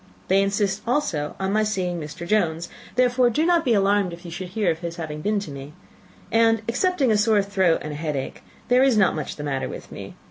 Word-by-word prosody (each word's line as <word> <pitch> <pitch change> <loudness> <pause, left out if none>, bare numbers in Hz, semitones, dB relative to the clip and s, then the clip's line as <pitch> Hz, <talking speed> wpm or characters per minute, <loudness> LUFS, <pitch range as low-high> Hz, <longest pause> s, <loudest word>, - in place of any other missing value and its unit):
They 195 +1 +4
insist 195 0 0
also 210 - -1
on 190 +1 -1
my 215 - +3
seeing 185 -5 -1
Mr. 160 +3 -7
Jones 170 -4 0 0.3
therefore 250 0 +3
do 300 +7 +1
not 345 -1 +3
be 240 -3 +2
alarmed 200 -2 +2
if 175 +1 -11
you 170 - -7
should 185 +2 -5
hear 185 -1 0
of 160 - -4
his 170 -1 -5
having 150 -3 -6
been 210 +4 0
to 175 - -7
me 140 +1 -9 0.6
and, 225 -1 +3
excepting 275 +1 +1
a 215 - +3
sore 210 -2 +3
throat 190 -4 +1
and 150 - -5
a - - -6
headache, 150 -4 -4 0.3
there 250 +2 +4
is 265 -4 +4
not 190 -6 +3
much 155 - -4
the 150 - -7
matter 135 -2 -2
with - - -9
me. - - -9
195 Hz, 225 wpm, -23 LUFS, 165-225 Hz, 0.6 s, They